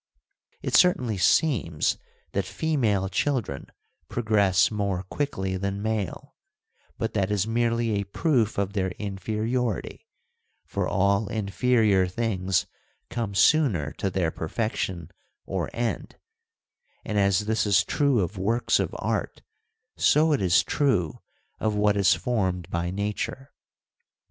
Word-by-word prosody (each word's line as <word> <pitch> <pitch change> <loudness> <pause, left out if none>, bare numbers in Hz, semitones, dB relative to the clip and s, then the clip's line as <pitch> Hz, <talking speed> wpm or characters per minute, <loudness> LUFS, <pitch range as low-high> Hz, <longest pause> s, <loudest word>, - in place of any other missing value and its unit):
It - - -3
certainly 125 - +3
seems 90 - +2 0.3
that 100 - 0
female 110 - 0
children 100 - -2 0.4
progress 100 -6 +2
more 100 -3 -1
quickly 95 -4 -3
than 100 +1 -3
male, 110 -3 -3 0.6
but 115 - -2
that 100 -2 0
is 105 -1 +1
merely 115 0 0
a 100 -1 0
proof 115 - 0
of 100 0 -1
their 95 -2 0
inferiority; 110 +3 -3 0.6
for - - -2
all 100 +3 +2
inferior 105 -1 +2
things 95 -3 0 0.5
come 115 -4 -3
sooner 100 - +3
to 100 - 0
their 90 -3 0
perfection 90 -2 -3 0.3
or - - -2
end, 120 0 -3 0.9
and 105 -2 0
as 100 -1 +3
this 110 0 0
is 95 -3 +4
true 140 -6 +2
of 95 +2 -3
works 115 +6 +1
of - - -2
art - - -3 0.5
so 155 +1 +4
it 140 - 0
is 90 -2 +4
true 105 - 0 0.4
of 110 -1 0
what 105 0 +3
is 100 -3 +4
formed 95 -8 -1
by 85 +1 -1
nature. 105 +8 -4
105 Hz, 125 wpm, -26 LUFS, 95-115 Hz, 0.9 s, is